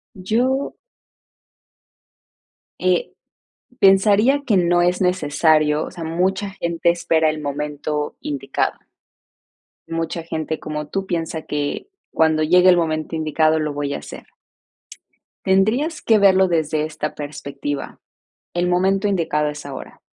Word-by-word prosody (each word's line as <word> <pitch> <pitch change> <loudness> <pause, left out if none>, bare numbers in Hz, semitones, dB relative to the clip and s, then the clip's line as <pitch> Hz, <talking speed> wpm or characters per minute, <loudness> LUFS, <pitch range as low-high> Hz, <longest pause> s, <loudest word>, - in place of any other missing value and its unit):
Yo. 245 +8 0 2.1
Eh, 180 -1 +1 0.7
pensaría 210 +8 +5
que 205 -5 +3
no 175 0 +3
es 180 +1 +1
necesario, 155 -3 +2
o - - -9
sea, 175 -2 -7
mucha 190 +5 -1
gente 170 -2 -1
espera 165 -2 +2
el 155 0 -3
momento 150 +1 -3
indicado. 135 -2 -2 1.1
Mucha 165 0 -3
gente 160 -1 -4
como 150 -1 -5
tú 195 +3 -3
piensa 165 -3 -3
que 145 - -3 0.2
cuando 160 -1 +2
llegue 180 +3 +5
el 180 - +6
momento 160 -1 -1
indicado 155 0 +2
lo 150 -1 -2
voy 145 -1 -3
a - - -4
hacer. - - -10 1.2
Tendrías 220 - +2
que 220 -2 +3
verlo 190 -1 +5
desde 155 -2 0
esta 155 -1 -4
perspectiva, 145 -1 -6 0.5
el 175 0 0
momento 190 +3 +2
indicado 160 -6 0
es 150 0 -6
ahora. 140 -1 -9
165 Hz, 120 wpm, -21 LUFS, 150-190 Hz, 2.1 s, el